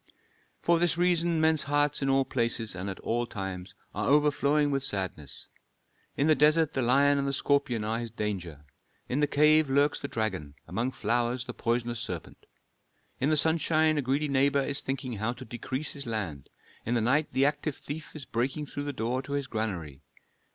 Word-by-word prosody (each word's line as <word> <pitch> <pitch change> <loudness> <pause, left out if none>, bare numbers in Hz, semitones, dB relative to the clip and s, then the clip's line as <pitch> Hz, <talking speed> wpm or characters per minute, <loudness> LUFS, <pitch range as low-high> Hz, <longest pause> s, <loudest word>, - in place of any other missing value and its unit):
"For 170 -1 +3
this 170 -1 +2
reason 175 -2 +2
men's 160 -1 +4
hearts 145 +1 +1
in 135 - 0
all 135 0 +3
places 115 -3 0
and 90 +2 -4
at 95 - -6
all 120 +1 -1
times 95 -2 -6 0.2
are - - -2
overflowing 145 0 +3
with 135 -1 0
sadness. 95 - -4 0.7
In 140 - +2
the 155 - +5
desert 155 +2 +3
the 135 - 0
lion 140 +3 +4
and 140 - -1
the - - 0
scorpion 140 -5 +1
are 110 +2 -1
his 120 -1 -4
danger, 90 -9 -5 0.4
in 130 - -1
the 150 - +3
cave 150 +1 +4
lurks 145 +2 +2
the 140 - -4
dragon, 95 - -3
among 115 +9 -1
flowers 120 0 0
the 125 - -6
poisonous 120 0 -1
serpent. 90 -7 -7 0.7
In 135 - +1
the 155 - +3
sunshine 160 0 +3
a - - +1
greedy 140 +3 0
neighbor 140 0 +2
is 140 +1 +1
thinking 130 -3 -4
how 110 +4 -1
to 130 +1 -10
decrease 130 +5 -4
his 140 -3 -5
land, 95 - -4 0.3
in 120 - -1
the 115 - +2
night 140 +7 +2
the 135 - +2
active 145 0 -1
thief 150 +2 -8
is 145 -4 -7
breaking 130 +6 -2
through 145 0 -6
the 145 - -3
door 125 +2 -1
to 140 +1 -7
his 140 -1 -1
granary. 90 - -4
135 Hz, 190 wpm, -28 LUFS, 115-145 Hz, 0.7 s, the